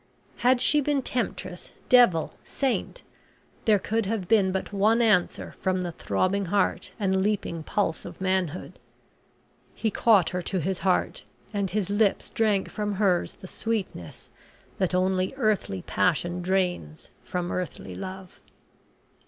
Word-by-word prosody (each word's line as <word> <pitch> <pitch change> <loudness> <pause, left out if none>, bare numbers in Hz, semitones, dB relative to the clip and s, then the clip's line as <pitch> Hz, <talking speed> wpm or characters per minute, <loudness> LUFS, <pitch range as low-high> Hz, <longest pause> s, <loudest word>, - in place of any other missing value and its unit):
Had 250 +1 +3
she 295 +4 +4
been 280 -1 0
temptress, 185 -8 -4
devil, 235 -11 +5
saint, 275 - -2 0.6
there 215 -3 +5
could 220 +1 -1
have 205 -4 -2
been 200 -3 +4
but 190 +2 -3
one 215 +4 +3
answer 215 -7 +2
from 185 -1 0
the 175 - -3
throbbing 195 +4 0
heart 200 +3 0
and 190 -2 +1
leaping 195 -5 -1
pulse 165 0 -1
of - - -9
manhood. 185 -3 -1 1.0
He 220 - -1
caught 210 -7 +4
her 180 0 -2
to 185 +2 -2
his 180 +3 -2
heart, 185 -2 0 0.3
and 200 -2 -1
his 200 0 -1
lips 205 -1 +1
drank 210 -3 +1
from 210 -1 -3
hers 190 -3 +1
the 185 - -8
sweetness 195 - -4 0.5
that 185 -2 +1
only 185 +4 +1
earthly 215 - 0
passion 175 0 0
drains 180 - -2
from 180 -1 -3
earthly 155 - -4
love. 185 - -8
190 Hz, 135 wpm, -26 LUFS, 180-215 Hz, 1.0 s, devil